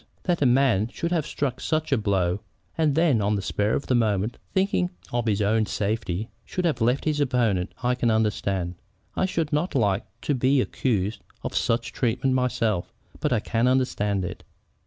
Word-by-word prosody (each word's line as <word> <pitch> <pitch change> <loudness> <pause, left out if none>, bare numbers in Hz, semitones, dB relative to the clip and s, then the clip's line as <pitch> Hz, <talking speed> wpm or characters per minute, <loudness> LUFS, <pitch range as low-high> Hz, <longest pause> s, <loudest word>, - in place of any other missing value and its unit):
That 175 -4 0
a 140 - +5
man 120 -5 +3
should 165 +7 -4
have 165 -5 0
struck 130 -3 -2
such 155 -1 -1
a 135 - +4
blow, 95 -3 +1 0.4
and 155 -4 +2
then, 155 -9 +3
on 105 +1 +1
the 100 - -1
spur 105 +2 0
of - - -2
the - - 0
moment, 110 -2 +1
thinking 190 -2 +1 0.2
of 120 -1 0
his 105 -1 +2
own 110 +1 +2
safety, 105 -1 -2
should 180 - -3
have 150 -8 0
left 125 +4 +2
his 155 -2 +1
opponent, 120 -9 +1
I 125 +1 +3
can 125 -1 +1
understand. 100 -5 0 0.4
I 190 - +1
should 165 -4 -2
not 150 +3 0
like 105 -6 +1
to 145 - 0
be 130 +1 +3
accused 110 -5 -1 0.2
of - - -4
such 115 +2 0
treatment 130 +2 +1
myself, 120 -7 0 0.3
but - - 0
I 105 - +2
can 115 +3 +1
understand 105 -7 +1
it. - - -7
120 Hz, 185 wpm, -25 LUFS, 105-140 Hz, 0.4 s, a